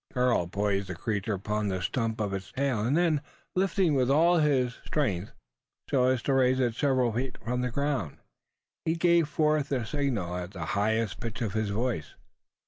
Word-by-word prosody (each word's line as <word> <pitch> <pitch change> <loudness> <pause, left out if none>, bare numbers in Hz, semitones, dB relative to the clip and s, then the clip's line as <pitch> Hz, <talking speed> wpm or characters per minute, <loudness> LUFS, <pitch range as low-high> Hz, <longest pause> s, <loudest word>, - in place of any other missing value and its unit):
Karl 125 -8 +2
poised 100 +1 -1
the 95 - -5
creature 105 +2 -2
upon 105 +2 -2
the 95 -2 -1
stump 115 +4 -1
of 100 -2 -1
its 95 -1 -5
tail; 135 -4 0
and 120 +8 +1
then, 165 -4 +2 0.3
lifting 185 -3 +2
with 130 -2 +2
all 165 +5 +5
his 130 -5 +1
strength 105 - -1 0.6
so 130 -2 +3
as 130 -1 +1
to 140 - +1
raise 130 -1 +3
it 120 -3 +1
several 130 -2 +1
feet 125 +3 -3
from 125 +2 -1
the 125 - 0
ground 140 - -2 0.7
he 160 - 0
gave 170 -2 +3
forth 150 -1 +1
the 125 -4 -1
signal 115 - -1
at 90 +2 -6
the 85 -4 -5
highest 110 0 0
pitch 115 +1 -5
of 105 -4 -2
his 110 -1 0
voice. 105 -6 -2
125 Hz, 185 wpm, -28 LUFS, 105-140 Hz, 0.7 s, all